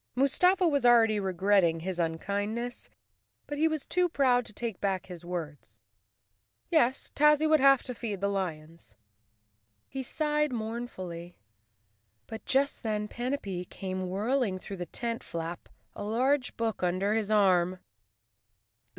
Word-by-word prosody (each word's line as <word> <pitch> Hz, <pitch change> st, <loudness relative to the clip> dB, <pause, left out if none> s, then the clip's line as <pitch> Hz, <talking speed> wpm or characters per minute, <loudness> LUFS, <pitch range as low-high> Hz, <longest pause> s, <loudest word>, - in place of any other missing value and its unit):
Mustafa 360 Hz, +8 st, +3 dB
was 285 Hz, -5 st, +1 dB
already 225 Hz, -3 st, +5 dB
regretting 190 Hz, -3 st, +2 dB
his 180 Hz, +1 st, -4 dB
unkindness, 205 Hz, +8 st, -2 dB, 0.6 s
but 290 Hz, 0 st, -5 dB
he 320 Hz, -, +4 dB
was 315 Hz, -3 st, -2 dB
too 360 Hz, 0 st, +2 dB
proud 255 Hz, -6 st, +2 dB
to -, -, -4 dB
take 225 Hz, -2 st, -5 dB
back 195 Hz, -2 st, -1 dB
his 175 Hz, -2 st, -10 dB
words. 170 Hz, -4 st, -7 dB, 0.9 s
Yes, 265 Hz, -6 st, +2 dB
Tazzy 300 Hz, +1 st, +4 dB
would 310 Hz, 0 st, +5 dB
have 275 Hz, -1 st, +5 dB
to 250 Hz, -, -5 dB
feed 220 Hz, -5 st, -4 dB
the 200 Hz, -, 0 dB
lions. 165 Hz, -, -5 dB, 0.9 s
He 270 Hz, -, -5 dB
sighed 300 Hz, +2 st, 0 dB
mournfully; 220 Hz, -7 st, -5 dB, 0.9 s
but 220 Hz, -, -8 dB
just 275 Hz, +2 st, +1 dB
then 210 Hz, -2 st, -2 dB
Panapee 235 Hz, -8 st, -3 dB
came 185 Hz, 0 st, -5 dB
whirling 215 Hz, +1 st, 0 dB
through 195 Hz, +1 st, -8 dB
the 175 Hz, -1 st, -5 dB
tent 230 Hz, +6 st, -4 dB
flap, 165 Hz, +1 st, -6 dB, 0.3 s
a -, -, -6 dB
large 250 Hz, +5 st, 0 dB
book 225 Hz, -2 st, -1 dB
un¬ 180 Hz, 0 st, 0 dB
der 200 Hz, +2 st, +1 dB
his 220 Hz, -2 st, -1 dB
arm. 185 Hz, -4 st, +3 dB
215 Hz, 140 wpm, -29 LUFS, 185-260 Hz, 0.9 s, already